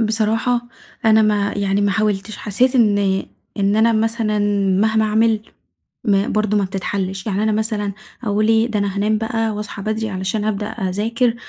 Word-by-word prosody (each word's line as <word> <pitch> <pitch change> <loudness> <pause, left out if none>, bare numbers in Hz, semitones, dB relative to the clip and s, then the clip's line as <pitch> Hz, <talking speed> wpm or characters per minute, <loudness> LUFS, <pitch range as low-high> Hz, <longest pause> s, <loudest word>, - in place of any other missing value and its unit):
بصراحة، 225 +2 0 0.4
أنا 220 0 +5
ما 210 -1 +1
يعني 200 0 0
ما 205 0 +2
حاولتش، 210 0 -1
حسيت 245 +6 +1
إن، 210 -4 +4 0.6
إن 200 +1 +2
أنا 230 +1 +4
مثلًا 220 -1 0 0.4
مهما 220 0 +2
أعمل، 220 0 +2 0.6
ما 200 -1 +2
برضه 215 -1 +1
ما 205 - +2
بتتحلش، 190 0 -3
يعني 205 -1 -1
أنا 220 - +2
مثلًا 210 -2 -1 0.3
أقول 215 -1 +1
إيه 225 +1 +3
ده 220 -3 -1
أنا 200 -1 -1
هانام 210 +2 +1
بقى، 225 0 -1
وأصحى 210 -1 -6
بدري 215 +1 -2
علشان 190 +2 -2
أبدأ 210 -1 -1
أذاكر، 220 +4 -1
215 Hz, 160 wpm, -19 LUFS, 200-220 Hz, 0.6 s, أنا